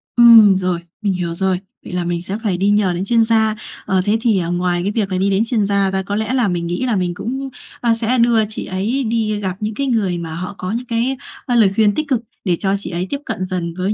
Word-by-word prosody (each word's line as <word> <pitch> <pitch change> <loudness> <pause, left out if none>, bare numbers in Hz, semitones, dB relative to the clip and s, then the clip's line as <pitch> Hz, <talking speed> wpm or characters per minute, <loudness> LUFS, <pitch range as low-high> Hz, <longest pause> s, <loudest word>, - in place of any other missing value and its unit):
Ừm, 225 -5 +8
rồi, 180 -2 -1 0.2
mình 200 -3 0
hiểu 170 -2 -3
rồi. 190 0 0 0.3
Vậy - - -8
là 180 - -1
mình 170 0 -2
sẽ 195 +3 -4
phải 190 -5 0
đi 200 +2 +1
nhờ 205 -3 +2
đến 175 - -3
chuyên 230 +1 +3
gia. 220 -1 +2 0.3
Ờ, 190 -1 +1
thế 210 +2 +2
thì, 220 -5 +2
ờ, 170 -1 -2
ngoài 175 0 0
cái 200 - -1
việc 205 -3 -1
là 185 - 0
đi 195 +2 +1
đến 200 +3 +2
chuyên 225 -3 +1
gia 200 -1 +1
ra 190 0 0
có 200 +2 -3
lẽ 220 +4 -1
là 245 -5 +2
mình 175 -2 -2
nghĩ 175 +9 -2
là 235 -4 0
mình 180 -2 -1
cũng, 265 +8 -4 0.3
a, 235 -2 +3
sẽ 230 +2 +1
đưa 235 -2 +3
chị 215 - 0
ấy 215 +9 -1
đi 220 -2 -1
gặp 190 -2 -3
những 215 0 -3
cái 275 +4 -2
người 205 -8 0
mà 165 -2 -5
họ 185 +3 -5
có 185 +2 -4
những 240 +3 -3
cái, 240 +3 -1 0.3
ơ, 245 - 0
lời 210 -5 +5
khuyên 210 -2 +3
tích 310 -1 -1
cực, 250 -4 0 0.2
để 180 - +2
cho 195 +3 0
chị 200 - +1
ấy 180 +1 -3
tiếp 285 - -2
cận 185 - -3
dần 175 -3 -3
với 190 +3 0
200 Hz, 275 wpm, -18 LUFS, 185-230 Hz, 0.3 s, Ừm